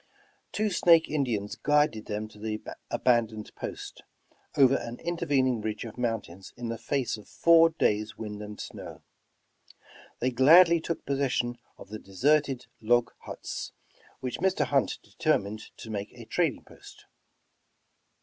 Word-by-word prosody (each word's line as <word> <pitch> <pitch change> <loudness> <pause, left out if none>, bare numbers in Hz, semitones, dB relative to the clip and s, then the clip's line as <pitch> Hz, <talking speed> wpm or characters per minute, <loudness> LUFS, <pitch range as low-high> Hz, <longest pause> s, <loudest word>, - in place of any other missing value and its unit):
Two 215 0 0
Snake 170 -2 +5
Indians 120 -9 -1
guided 150 -7 +1
them 105 +1 -3
to 105 - -16
the 110 0 -3 0.3
abandoned 115 -3 0
post, - - -7 0.6
over 135 -1 +6
an 120 -2 -3
intervening 135 -8 0
ridge 110 +2 -4
of 115 - -8
mountains 110 -7 -4
in 120 -1 -5
the 115 - -3
face 130 0 -1
of 105 - -14
four 165 0 +5
days' 110 -9 0
wind 105 -1 -6
and 105 0 -8
snow. - - -9 1.2
They 130 +2 0
gladly 165 +7 +7
took 165 0 -4
possession 125 -3 -1 0.2
of - - -13
the 110 +1 -6
deserted 135 +6 +1 0.2
log 120 +2 +2
huts, - - -7 0.5
which 130 -1 -4
Mr. 190 +1 +1
Hunt 135 +1 +1
determined 110 -10 -1
to 110 - -9
make 100 0 -4
a 120 -2 -11
trading 155 +3 0
post. - - -16
120 Hz, 140 wpm, -28 LUFS, 110-145 Hz, 1.2 s, gladly